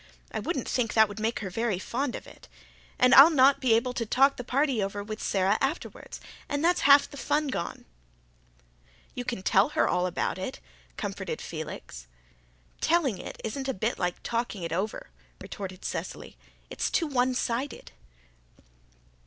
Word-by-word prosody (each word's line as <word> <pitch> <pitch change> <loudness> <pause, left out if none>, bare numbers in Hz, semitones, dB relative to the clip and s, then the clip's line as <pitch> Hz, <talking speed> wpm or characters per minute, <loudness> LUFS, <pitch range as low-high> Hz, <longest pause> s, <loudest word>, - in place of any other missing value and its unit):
I - - -3
wouldn't - - -3
think 235 -4 -1
that 220 -1 +6
would 205 +1 -8
make 225 +2 -1
her 190 -3 -5
very 225 -1 -1
fond 245 +7 -3
of - - -8
it. - - -15 0.5
And 250 +1 +5
I'll 280 +4 +10
not 275 -3 +5
be 250 -3 +3
able 250 +2 0
to 240 - -2
talk 270 +5 +3
the 250 - -6
party 265 -1 +1
over 200 +1 -3
with 215 +1 -6
Sara 195 +2 +1
afterwards 275 +5 -4 0.3
and 290 +2 -1
that's 355 +1 +3
half 280 0 +8
the 285 - -12
fun 295 +1 0
gone." 170 -10 -4 1.3
"You 250 - -4
can 235 -6 -4
tell 195 +1 +4
her - - +1
all 180 0 +1
about 180 - -2
it," - - -5 0.4
comforted - - -4
Felix. 60 0 -7 0.7
"Telling 305 - +1
isn't 265 +5 -6
a - - -1
bit 220 +5 -2
like 180 0 -2
talking 230 -5 -2
it 165 -1 -3
over," 195 +5 -3 0.3
retorted 185 -2 -8
Cecily. - - -5 0.4
"It's - - -1
too 335 - +1
one 255 -3 +1
sided." 250 +3 -3
235 Hz, 165 wpm, -28 LUFS, 205-270 Hz, 1.3 s, I'll